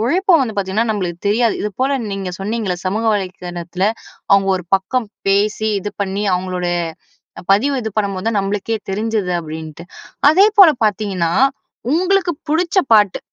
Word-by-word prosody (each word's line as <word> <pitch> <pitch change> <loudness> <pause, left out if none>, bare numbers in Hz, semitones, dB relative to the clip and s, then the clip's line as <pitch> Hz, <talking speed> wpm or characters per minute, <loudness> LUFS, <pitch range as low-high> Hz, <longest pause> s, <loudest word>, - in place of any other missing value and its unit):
உழைப்ப 360 +7 +3
வந்து 225 -4 -3
பார்த்தீங்கன்னா 200 +4 0
நம்ளுக்கு 180 -5 -3
தெரியாது. 225 +1 +2
இது 210 - -2
போல 270 +2 +2 0.2
நீங்க 195 -2 -4
சொன்னீங்கள்ல 210 -2 -2
சமூக 210 +5 -1
வலைத்தளத்தில 180 -2 -4 0.5
அவுங்க 195 0 +4
ஒரு 180 - -7
பக்கம் 225 +5 -3 0.2
பேசி, 210 +2 +1
இது 205 +2 -5
பண்ணி, 195 +1 -3
அவங்களுடைய 180 -1 -2 0.8
பதிவு 270 +8 +2
இது 220 - -3
பண்ணும்போது 200 -1 -1
தான், 215 -3 0
நம்மளுக்கே 205 +3 -2
தெரிஞ்சது 210 -2 -1
அப்படின்ட்டு. 160 0 -8 0.5
அதே 385 +6 +6
போல 365 -5 +10
பார்த்தீங்கன்னா, 190 -5 0 0.6
உங்களுக்கு 365 +2 +2 0.2
புடிச்ச 340 +4 0 0.2
பாட்டு 205 -3 +4
205 Hz, 140 wpm, -18 LUFS, 185-230 Hz, 0.8 s, போல